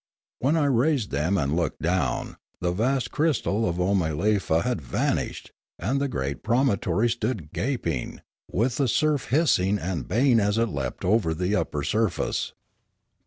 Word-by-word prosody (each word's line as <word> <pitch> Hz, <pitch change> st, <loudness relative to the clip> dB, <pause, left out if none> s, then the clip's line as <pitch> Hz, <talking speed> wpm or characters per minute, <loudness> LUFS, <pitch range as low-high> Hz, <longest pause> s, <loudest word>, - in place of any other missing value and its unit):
When 145 Hz, +6 st, +2 dB
I 150 Hz, -, +2 dB
raised 135 Hz, -, +2 dB
them 80 Hz, +8 st, +1 dB
and 70 Hz, -2 st, 0 dB
looked 85 Hz, 0 st, -1 dB
down, 90 Hz, +3 st, -1 dB, 0.2 s
the 90 Hz, 0 st, 0 dB
vast 125 Hz, +8 st, 0 dB
crystal 120 Hz, -, +1 dB
of 85 Hz, -, -2 dB
Oomalefa 90 Hz, -1 st, +1 dB
had 125 Hz, -9 st, -1 dB
vanished 65 Hz, -, -2 dB, 0.3 s
and 130 Hz, +10 st, -1 dB
the 140 Hz, -, +1 dB
great 70 Hz, -, -3 dB
promontory 115 Hz, -4 st, +1 dB
stood 110 Hz, -, -3 dB
gaping, 100 Hz, -, -2 dB, 0.3 s
with 115 Hz, +5 st, 0 dB
the 140 Hz, -, +2 dB
surf 150 Hz, +3 st, +1 dB
hiss 155 Hz, -, +3 dB
ing 95 Hz, +3 st, +1 dB
and 85 Hz, -7 st, -3 dB
baying 120 Hz, 0 st, +3 dB
as 105 Hz, +1 st, +1 dB
it 115 Hz, 0 st, +2 dB
leapt 70 Hz, -4 st, -4 dB
over 90 Hz, -5 st, +2 dB
the 90 Hz, +5 st, 0 dB
upper 75 Hz, -8 st, -1 dB
surface. 105 Hz, +1 st, -1 dB
105 Hz, 155 wpm, -25 LUFS, 85-125 Hz, 0.3 s, hiss